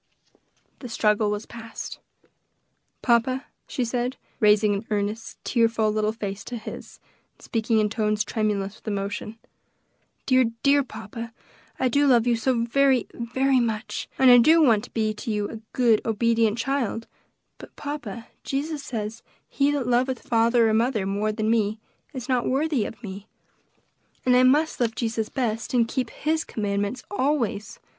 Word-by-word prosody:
The 250 - -8
struggle 210 -1 +2
was 210 +1 -3
past. 230 -1 -8 1.0
"Papa," 255 +2 +2 0.2
she 250 - -2
said, 245 +2 -2 0.2
raising 210 -2 +4
an 200 +3 -4
earnest, 210 +1 -2
tearful 230 -3 +2
little 215 0 +1
face 205 -3 -5
to 245 - -5
his, 220 - -9 0.4
and - - -26
speaking 225 0 0
in 215 -1 +3
tones 215 0 0
tremulous 210 -2 -2
with - - -23
emotion, 205 +2 -3 0.9
"dear, 255 -1 +4 0.2
dear 285 0 +5
papa, 225 -1 -8 0.5
I 260 - +2
do 285 +4 +3
love 240 -3 +5
you 240 -1 +3
so 230 0 +1
very, 265 +1 +3
very 260 +3 +1
much, 220 -2 -2
and 260 -1 +7
I 245 - +9
do 315 +7 +6
want 225 -7 +4
to - - -15
be 215 -1 0
to 215 - -7
you 210 -1 0
a 225 - -7
good, 235 -4 +3
obedient 230 0 +2
child; 240 -3 -1 0.5
but, - - -12
papa, 240 -7 -6 0.2
Jesus 290 +2 -3
says, 225 -2 -5 0.3
'He 280 0 +2
that 290 -3 0
loveth 250 +1 +1
father 230 0 +4
or 220 - +2
mother 225 -2 +1
more 205 +2 0
than 215 0 0
me, 215 -1 +1 0.3
is 260 -4 -6
not 250 -3 +1
worthy 280 -3 +1
of 230 - -9
me,' 200 0 -7 1.0
and 250 -1 +5
I 250 - +6
must 290 +5 +3
love 230 -2 0
Jesus 225 -2 -2
best, 230 -1 -2
and 235 -2 +4
keep 250 -1 -2
his 315 +1 -1
commandments 205 +2 -2
always. 260 - -1
230 Hz, 160 wpm, -25 LUFS, 215-255 Hz, 1.0 s, I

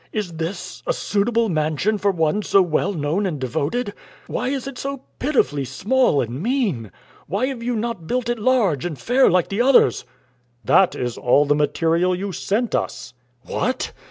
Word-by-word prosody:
Is 210 -5 -3
this 170 +3 -5
a - - +2
suitable 230 +3 0
mansion 160 +5 0
for 200 - +2
one 170 +1 +1
so 200 - +3
well 175 0 +1
known 170 +4 -1
and 155 -6 -4
devoted? 150 - -2 0.3
Why - - -3
is 270 -1 -2
it 275 -2 -7
so 275 -1 -5 0.2
pitifully 145 - +1
small 190 - +1
and 125 +4 -4
mean? 200 - -1 0.4
Why 200 +7 0
have 260 -3 -4
you 240 +1 -1
not 220 -7 -3
built 250 +2 -1
it 240 -1 -1
large 210 - +2
and 170 -5 -4
fair, 255 - +3
like 180 0 +2
the 200 +4 0
others?" 260 +1 +4 0.6
"That 190 - +4
is 120 -1 -3
all 140 +4 +4
the 145 - +3
material 165 +5 +1
you 195 +2 -4
sent 215 +6 -1
us." - - -3 0.3
"What!" 255 +1 -2
195 Hz, 175 wpm, -21 LUFS, 155-240 Hz, 0.6 s, others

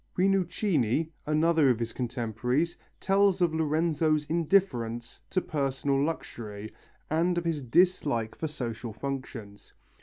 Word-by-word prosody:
Rinuccini, 175 - +1 0.2
another 155 -1 +3
of 125 - +3
his 115 0 -3
contemporaries, 125 +6 -1 0.2
tells 195 0 +3
us - - -10
of 170 -2 +3
Lorenzo's 155 -1 +1
indifference 145 -9 0
to 185 - +1
personal 140 -2 0
luxury 110 -9 -5 0.4
and 170 +3 +2
of 175 - -1
his 160 -3 -1
dislike 140 -5 +2
for 160 - -4
society 120 -5 -5
functions. 120 -7 -6
150 Hz, 120 wpm, -28 LUFS, 120-170 Hz, 0.4 s, another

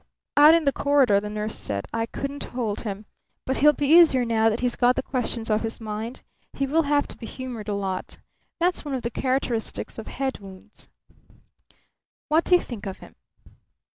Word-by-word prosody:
Out 300 +3 +8
in 335 -2 +1
the 280 - +4
corridor 275 -8 +3
the 210 +1 -6
nurse 215 +1 -3
said: 100 -1 -4
"I 225 0 -1
couldn't 275 +4 -5
hold 230 -5 -3
him. 210 -1 -5 0.4
But 265 - -1
he'll 300 +1 +6
be 290 0 -2
easier 300 -5 +6
now 225 -1 +3
that 220 +2 -2
he's 245 -1 0
got 245 0 +3
the - - -2
questions 235 -3 -2
off 215 - +2
his 225 0 -4
mind. 220 +2 -6 0.3
He 275 - -1
will 310 +4 +2
have 290 -1 +2
to - - -6
be 225 - -7
humoured 245 -5 -7
a 205 - -1
lot. 190 -2 -4 0.4
That's 355 +1 +1
one 290 -3 -3
of 255 - -4
the 235 - -2
characteristics 255 -3 -2
of 220 - -8
head 270 0 -3
wounds." 195 +1 -14 1.4
"What 315 +2 +3
do 360 - +5
you 355 - +3
think 220 -4 -7
of 190 - -5
him?" - - -14
240 Hz, 200 wpm, -24 LUFS, 215-275 Hz, 1.4 s, Out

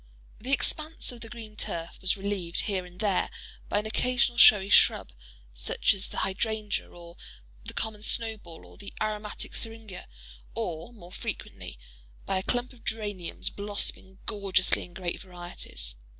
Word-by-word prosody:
The 250 +5 -4
expanse 310 +3 +1
of 240 -2 -10
the 225 - -7
green 220 -3 -9
turf 170 -5 -3
was 190 +1 +3
relieved, 190 -3 -2
here 190 -3 -1
and 180 0 -15
there, 200 -4 +2 0.4
by - - +2
an 210 - +1
occasional 240 +1 +2
showy 200 -3 +9
shrub, - - +6 0.4
such - - +2
as 195 -1 -2
the - - -8
hydrangea, 210 +1 -1
or 170 0 -12 0.5
the - - -7
common 220 -1 -2
snowball, 215 -7 0
or - - -15
the 200 - -8
aromatic 210 -1 -3
seringa; 225 -4 -3 0.5
or, 165 +6 -2
more 180 -7 -13
frequently, 60 - -5 0.5
by 190 - +1
a - - -1
clump 245 +5 0
of 240 - -18
geraniums 205 -6 -1
blossoming 200 -2 -2
gorgeously 195 -3 +2
in 175 - -16
great 180 -2 -2
varieties. 175 - -5
205 Hz, 150 wpm, -29 LUFS, 180-220 Hz, 0.5 s, showy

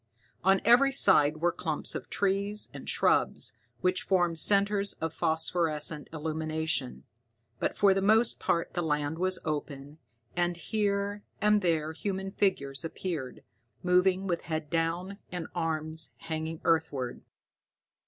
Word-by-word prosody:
On 195 0 +4
every 250 +4 +6
side 155 - +4
were 175 +2 +2
clumps 160 -3 -3
of - - -6
trees 200 +1 0
and - - -7
shrubs, - - +2 0.3
which 185 0 +1
formed 175 -4 +1
centers 200 +1 +3
of 160 -1 -4
phosphorescent 160 -2 0
illumination, 160 -3 -2 0.6
but - - -1
for 200 -1 +5
the 195 - 0
most 220 +4 +3
part 170 - 0
the 175 - -1
land 150 0 -1
was 185 0 +1
open, 145 -1 -4 0.4
and 175 -1 0
here 200 +1 -1 0.2
and 210 0 +3
there 160 -3 0
human 195 +2 -3
figures 140 -9 0
appeared, 165 -5 -5 0.4
moving 180 +1 +3
with 175 -3 -1
head 155 -2 -4
down 170 +4 -1
and 175 -3 -4
arms 160 -2 -2
hanging 160 0 -5
earthward. 150 -6 0
170 Hz, 130 wpm, -29 LUFS, 155-195 Hz, 0.6 s, every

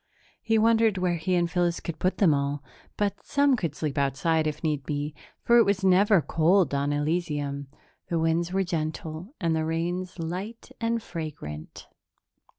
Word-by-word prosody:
He 225 -1 +2
wondered 225 -1 +4
where 180 -2 +1
he 180 +3 0
and 175 -1 +2
Phyllis 175 0 0
could 165 -2 -6
put 185 - 0
them 180 -7 +5
all, 140 0 -1 0.3
but 205 -1 -1
some 280 -1 +3
could 165 - -3
sleep 150 -3 -2
outside, 155 +4 +1
if 150 - -4
need 150 -3 0
be, 145 +2 -3 0.3
for 235 - +5
it - - +7
was 200 -1 0
never 190 -1 +5
cold 165 0 +3
on 140 +1 0
Elysium. 145 -2 -1 0.4
The 170 - -1
winds 165 +2 +1
were 195 +1 +1
gentle 160 - -4
and 165 -4 +1
the 160 - 0
rains 175 +3 -2
light 185 +7 -5
and 230 0 0
fragrant. 145 - -7
170 Hz, 165 wpm, -27 LUFS, 155-190 Hz, 0.4 s, it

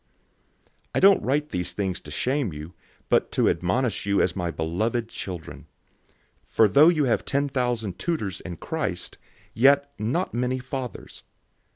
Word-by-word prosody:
004:014 - - -37 0.2
I - - +3
don't 195 0 +7
write 145 +3 0
these 90 -1 -3
things 95 -2 -2
to - - -12
shame 130 - -1
you, 75 +3 -8 0.3
but - - +2
to - - +3
admonish 105 +4 0
you 100 0 +2
as 90 - +1
my 90 -3 -2
beloved 110 +9 -1
children. 90 -7 -7 0.8
004:015 - - -24
For 110 - +6
though 145 - +6
you 155 -4 +2
have 125 -4 +1
ten 140 +1 0
thousand 120 -8 -2
tutors 105 - -2
in 90 -3 -7
Christ, - - -4 0.3
yet 140 +3 +4
not 130 - -1
many 125 +2 0
fathers. 130 -1 -6
120 Hz, 160 wpm, -25 LUFS, 90-140 Hz, 0.8 s, don't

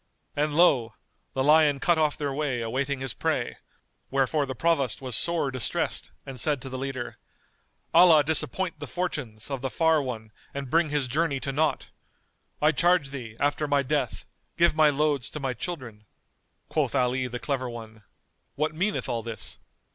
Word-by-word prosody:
And 150 +1 0
lo! 125 -10 +4 0.4
the 135 - +1
lion 150 -1 +5
cut 170 +2 +3
off 155 -2 +2
their 145 -2 -2
way 135 -4 -1
awaiting 130 +4 -2
his 135 -4 -2
prey, - - -1 0.5
wherefore 135 +2 +1
the 130 - -4
Provost 140 -4 +1
was 130 -3 -2
sore 165 0 0
distressed 125 -6 -1 0.2
and 130 -2 -7
said 145 +3 +2
to 135 - -6
the 130 - -5
leader, 135 -2 -4 0.8
"Allah 165 -4 +7
disappoint 170 +4 0
the - - -6
fortunes[FN#219] 145 -10 -3
of 135 -2 -3
the 135 - -2
far 160 +2 +3
one 110 -5 -5 0.2
and 140 -2 -5
bring 165 -1 +3
his 145 -2 0
journey 145 +1 0
to 135 - -2
naught! 155 +2 0 0.7
I 155 - +6
charge 165 -2 +2
thee, 120 -5 -7
after 145 +1 +1
my 145 -1 +2
death, 140 -3 -1 0.3
give 170 0 +5
my 155 -1 +5
loads 145 -3 +1
to 150 - -6
my 135 -3 -1
children." 120 - -6 0.6
Quoth - - 0
Ali 125 +1 +1
the 125 0 -5
Clever 130 -1 -2
One, 110 -2 -9 0.5
"What 155 +1 0
meaneth 190 +6 -1
all 115 - -1
this?" 110 -2 -7
140 Hz, 170 wpm, -27 LUFS, 125-155 Hz, 0.8 s, Allah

